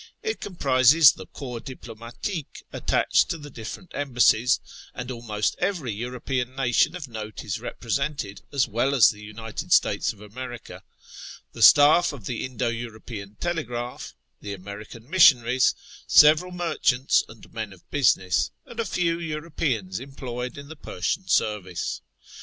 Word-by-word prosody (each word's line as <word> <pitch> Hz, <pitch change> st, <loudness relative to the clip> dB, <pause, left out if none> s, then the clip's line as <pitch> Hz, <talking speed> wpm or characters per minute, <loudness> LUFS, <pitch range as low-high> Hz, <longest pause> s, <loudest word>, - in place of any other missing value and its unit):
It 440 Hz, -1 st, -3 dB
comprises 145 Hz, -3 st, +5 dB
the -, -, -11 dB
covps 125 Hz, -4 st, -7 dB
diploviatique 120 Hz, -, -7 dB
attached -, -, +2 dB
to 165 Hz, -, -2 dB
the 145 Hz, -2 st, -11 dB
different 115 Hz, -, -8 dB
embassies 125 Hz, -3 st, +3 dB, 0.4 s
(and 125 Hz, +1 st, -5 dB
almost 110 Hz, -3 st, -2 dB
every 165 Hz, -, -1 dB
European 125 Hz, +3 st, -3 dB
nation 135 Hz, +5 st, +2 dB
of 150 Hz, -6 st, -6 dB
note 110 Hz, -2 st, -7 dB
is -, -, -3 dB
represented, 135 Hz, -4 st, -3 dB
as 140 Hz, -3 st, +2 dB
well 120 Hz, +5 st, 0 dB
as 125 Hz, -, +7 dB
the 105 Hz, -, -7 dB
United 110 Hz, +1 st, -7 dB
States -, -, +3 dB
of -, -, -16 dB
America); 120 Hz, +4 st, -9 dB, 0.7 s
the -, -, -8 dB
staff 150 Hz, +3 st, +7 dB
of 125 Hz, -8 st, -10 dB
the 120 Hz, -, -3 dB
Indo 125 Hz, -1 st, -2 dB
European 110 Hz, -3 st, -7 dB
Telegraph; 125 Hz, -7 st, -4 dB, 0.2 s
the 100 Hz, -, -6 dB
American 105 Hz, +4 st, -10 dB
missionaries; 130 Hz, -7 st, +5 dB, 0.3 s
several 155 Hz, +4 st, +6 dB
merchants 165 Hz, -7 st, +1 dB
and 110 Hz, -1 st, -15 dB
men 110 Hz, -3 st, -4 dB
of 95 Hz, -3 st, -17 dB
business; 100 Hz, -10 st, +2 dB, 0.2 s
and 235 Hz, -, -11 dB
a 230 Hz, -, 0 dB
few 170 Hz, -3 st, 0 dB
Europeans 150 Hz, -, -3 dB
employed 125 Hz, -2 st, -6 dB
in 140 Hz, 0 st, -9 dB
the 160 Hz, -, -9 dB
Persian 95 Hz, -, -3 dB
service. 95 Hz, -3 st, -1 dB
125 Hz, 140 wpm, -25 LUFS, 110-145 Hz, 0.7 s, as